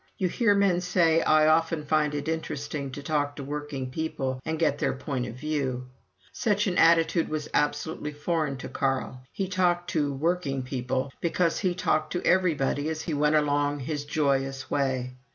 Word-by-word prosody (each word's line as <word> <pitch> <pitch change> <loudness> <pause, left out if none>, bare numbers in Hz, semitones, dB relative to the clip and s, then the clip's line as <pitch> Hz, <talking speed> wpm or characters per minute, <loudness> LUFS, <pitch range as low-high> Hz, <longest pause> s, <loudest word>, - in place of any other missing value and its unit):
You 185 - 0
hear 205 +1 +3
men 195 -3 +3
say: 170 -2 +3
"I 155 -1 +4
often 160 0 +2
find 150 0 +1
it 145 +1 -3
interesting 150 -3 -3
to 145 - -7
talk 145 -1 0
to 140 - -6
working 145 -2 -5
people 135 -4 -3
and 160 0 -2
get 155 -3 +1
their - - +1
view - - -9
point." 130 0 -3 0.5
Such 210 -2 +1
an 185 -3 0
attitude 165 0 +4
was 155 -1 -3
absolutely 150 +1 -1
foreign 150 -1 -1
to - - -7
Carl. 135 -1 -2
He 195 - -2
talked 180 -1 +1
to 145 -3 +1
"working 140 -2 -1
people" 130 +1 -2
because 170 0 +1
he 180 -3 0
talked 155 -3 0
to 180 - -2
everybody 155 -5 +2
as 160 0 -3
he 160 - -3
went 150 +1 +2
along 145 -1 +1
his 145 +2 -3
joyous 135 -3 -1
way. 130 -2 0
150 Hz, 170 wpm, -27 LUFS, 140-165 Hz, 0.5 s, I